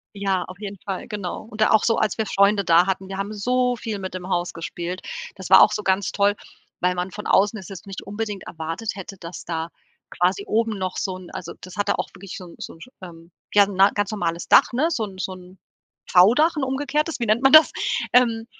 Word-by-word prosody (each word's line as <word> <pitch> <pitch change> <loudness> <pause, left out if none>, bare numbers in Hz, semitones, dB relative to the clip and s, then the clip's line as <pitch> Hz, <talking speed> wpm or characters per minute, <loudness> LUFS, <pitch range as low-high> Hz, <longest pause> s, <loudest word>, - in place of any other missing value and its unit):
Ja. 195 -2 -1
Auf 185 +2 -12
jeden 200 -1 -7
Fall, 195 -2 -5
genau. 205 -5 -5
Und 215 - -8
da 215 - +4
auch 220 - +4
so 230 - +2
als 215 -1 0
wir 220 - 0
Freunde 200 +1 +3
da 170 +1 +5
hatten, 190 0 -2
wir 195 - -5
haben 200 +2 -4
so 250 +4 0
viel 220 -2 -5
mit 190 -1 -6
dem 185 0 -6
Haus 175 -1 -1
gespielt. 175 +2 -5 0.4
Das 190 -2 -8
war 190 - +9
auch - - +5
so 210 - -2
ganz 190 0 0
toll, 205 0 +2 0.5
weil 180 0 +1
man 180 +1 -3
von 210 +2 -8
außen 205 +3 +3
es 190 - -10
jetzt 195 -2 -10
nicht 195 -1 -7
unbedingt 205 -1 -5
erwartet 165 +7 -4
hätte, 195 0 -8
dass 170 -1 -9
da 165 -1 -3 0.4
quasi 185 +3 0
oben 225 0 0
noch 185 -1 -3
so 190 -2 -2
'n 185 -1 -12
also, - - -7
das 185 - -10
hatte 205 0 0
auch - - -2
wirklich 195 0 -9
so 185 - -8
'n 175 - -13
so - - -8
'n, - - -17 0.2
ähm, 170 -2 -12 0.2
ja, 205 -1 +7
ne 195 0 +4
'n - - -10
ganz 205 -1 -1
normales 170 -5 -3
Dach, - - +6
ne, 290 +7 +2
so 240 -9 -1
'n 195 -2 -9
so 190 - -3
'n 185 0 -13 0.5
V-Dach, 245 - +5
'n 290 - 0
umgekehrtes, 290 +4 -1
wie - - +1
nennt 220 +3 +2
man 270 - +5
das? 310 0 +9 0.4
Ähm. 230 -2 +3
195 Hz, 240 wpm, -23 LUFS, 185-215 Hz, 0.5 s, war